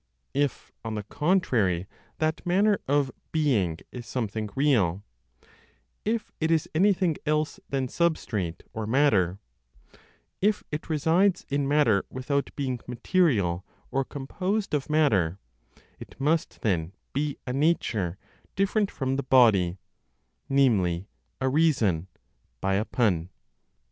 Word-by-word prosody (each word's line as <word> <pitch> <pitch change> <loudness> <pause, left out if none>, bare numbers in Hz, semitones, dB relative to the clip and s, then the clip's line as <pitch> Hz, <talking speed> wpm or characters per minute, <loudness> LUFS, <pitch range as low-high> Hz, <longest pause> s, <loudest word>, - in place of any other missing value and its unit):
If, 145 -1 -1
on 110 -1 -4
the 105 - -3
contrary, 115 - +1 0.3
that 155 0 -1
"manner 200 +4 +3
of 140 -1 +2 0.2
being" 115 - +1
is 120 -2 -8
something 110 -3 -3
real, 105 - +2 1.0
if 220 +1 -1
it 160 - +2
is 165 -2 +2
anything 185 -1 +3
else 155 0 0
than 135 -1 0
substrate 120 - -1
or 110 -1 -4
matter, 110 -9 +3 1.0
if 210 +2 +2
it 150 +2 -5
resides 165 +5 +2
in 140 -1 0
matter 140 -9 +3
without 140 +2 -1
being 130 -3 -2
material 120 - +1 0.3
or 135 0 +1
composed 185 +11 -3
of 145 -1 -1
matter, 105 - +2 0.6
it - - -12
must 155 +4 0
then 90 -4 0 0.2
be 145 +1 -1
a 125 - -3
nature 115 - +1 0.4
different 200 +1 +1
from 135 -1 -2
the - - 0
body, 110 -10 +4 0.7
namely, 100 -11 +2 0.3
a 130 - 0
reason 130 - +2 0.5
(by 95 +7 0
a 100 +3 +1
pun). 90 -10 +1
135 Hz, 120 wpm, -27 LUFS, 105-155 Hz, 1.0 s, body